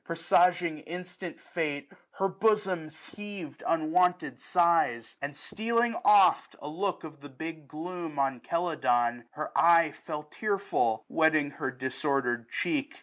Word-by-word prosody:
Presaging 170 0 +2
instant 180 +2 -8
fate, 150 -4 -4 0.2
her 195 - 0
bosom 195 -4 0
heaved 195 +1 -9
* - - -6
^^95 - - +1
Unwonted 180 +3 +1
sighs 170 -10 +2
j - - -23
and 140 0 -4
stealing 230 +9 0
oft 205 -2 +5
a - - -8
look 185 +5 -2
Of 155 -2 -10
the 145 - -10
big 160 +2 -8
gloom 165 +1 -6
on 135 -3 0
Celadon, 120 -9 0
her 155 - -6
eye 165 -2 +5
Fell 150 -1 -7
tearful, 195 - -1
wetting 155 -3 +2
her 140 - -3
disordered 130 -2 -1
cheek. 300 -1 -2
165 Hz, 140 wpm, -29 LUFS, 145-180 Hz, 0.2 s, oft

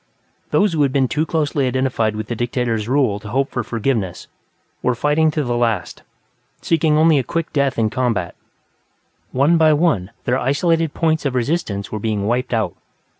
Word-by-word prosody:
Those 205 -4 +2
who 155 - +1
had 140 -2 +3
been 135 -1 +2
too 155 +5 -1
closely 145 -4 0
identified 125 -4 0
with 110 0 -4
the 120 - -3
dictator's 115 -2 -1
rule 130 -7 +2
to 105 - -11
hope 135 +5 0
for 120 - -2
forgiveness 110 -4 -2 0.6
were 125 - +1
fighting 150 +5 +2
to 150 -1 -1
the 120 -2 -1
last, 115 -7 -1 0.6
seeking 160 -2 +2
only 155 -2 +5
a - - -1
quick 165 +5 -3
death 140 -2 +1
in 110 -2 +1
combat; 115 -9 -1 1.0
one 145 +6 +3
by 155 -1 +5
one, 150 - +1
their 125 +2 +1
isolated 160 +4 +1
points 160 -1 +1
of 135 -3 -1
resistance 120 -6 -2
were 110 - -3
being 105 -2 -1
wiped 120 +4 -1
out. 110 -3 0
130 Hz, 175 wpm, -19 LUFS, 115-150 Hz, 1.0 s, only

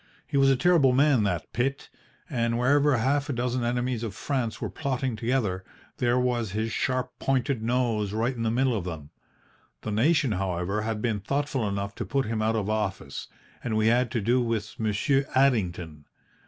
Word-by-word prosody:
He 145 - -6
was 135 0 +5
a 135 - +5
terrible 155 -3 +4
man 140 -2 +4
that 90 -5 -2
Pitt, 135 +3 -1 0.4
and 115 -1 0
wherever 140 +2 +3
half 140 +5 +1
a - - 0
dozen 125 0 -1
enemies 120 0 -1
of 110 -5 -4
France 130 -6 -2
were - - -2
plotting 130 -4 -2
together, 110 -5 -1 0.3
there 120 0 +2
was 120 -5 0
his 110 +2 -1
sharp 130 +1 -1
pointed 135 -2 0
nose 115 -3 0
right 115 +4 0
in 115 - -5
the 115 - +1
middle 125 +1 +1
of 100 - -2
them. 80 -5 -7 0.7
The 110 - -4
nation, 135 +4 +3
however, 95 +1 -1
had 110 -1 -3
been 115 -4 0
thoughtful 135 0 -1
enough 100 +1 -3
to - - -4
put 135 -1 0
him 110 0 -2
out 110 +1 +1
of 105 -3 -1
office, 105 -9 -3 0.4
and 110 -3 -1
we 110 +1 +3
had 120 +1 +2
to 115 - 0
do 120 +5 +2
with 115 -3 -3
Monsieur 130 +6 +1
Addington. 90 - +1
120 Hz, 185 wpm, -27 LUFS, 105-130 Hz, 0.7 s, was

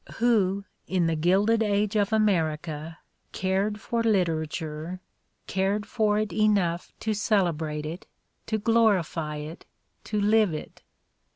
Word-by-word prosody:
Who, 200 -5 +2 0.2
in 180 -2 +1
the 165 -1 +1
Gilded 195 +8 +3
Age 210 0 +1
of 205 -1 +2
America, 160 -6 0 0.4
cared 195 +3 0
for 235 +3 -1
literature, 165 -4 -1 0.5
cared 195 +2 0
for 210 -1 +1
it 215 -1 -1
enough 200 -6 +1
to 220 - 0
celebrate 165 -8 0
it, 165 +4 -7 0.4
to 220 - 0
glorify 200 -9 +2
it, 150 +3 -7 0.4
to 210 - -1
live 210 -4 +3
it? - - -9
195 Hz, 120 wpm, -26 LUFS, 165-215 Hz, 0.5 s, Gilded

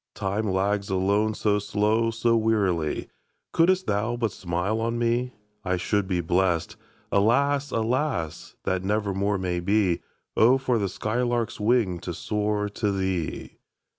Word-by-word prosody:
Time 100 +2 -1
lags 100 +1 0
alone 100 +3 +1
so 105 -1 +1
slow, 105 +3 +1
so 115 +1 +1
wearily; 100 -8 +1 0.5
Couldst 185 +3 +3
thou 110 +4 0
but 115 -3 0
smile 95 +6 -2
on 115 +1 -1
me, 120 +1 0 0.3
I 90 -2 0
should 100 +2 0
be 90 -2 0
blest. 85 -1 0 0.4
Alas, 140 +7 +2
alas! 115 - -2
that 95 0 -1
never 105 0 0
more 100 +1 0
may 90 -2 -2
be. 95 -1 +1 0.3
Oh, 125 +4 +5
for 130 -3 0
the 100 -2 -1
sky 110 +6 -2
lark's 120 -2 -1
wing 105 -5 +2
to 85 0 -5
soar 105 +1 -1
to 100 0 -1
thee! 95 -4 -3
105 Hz, 145 wpm, -25 LUFS, 95-115 Hz, 0.5 s, Oh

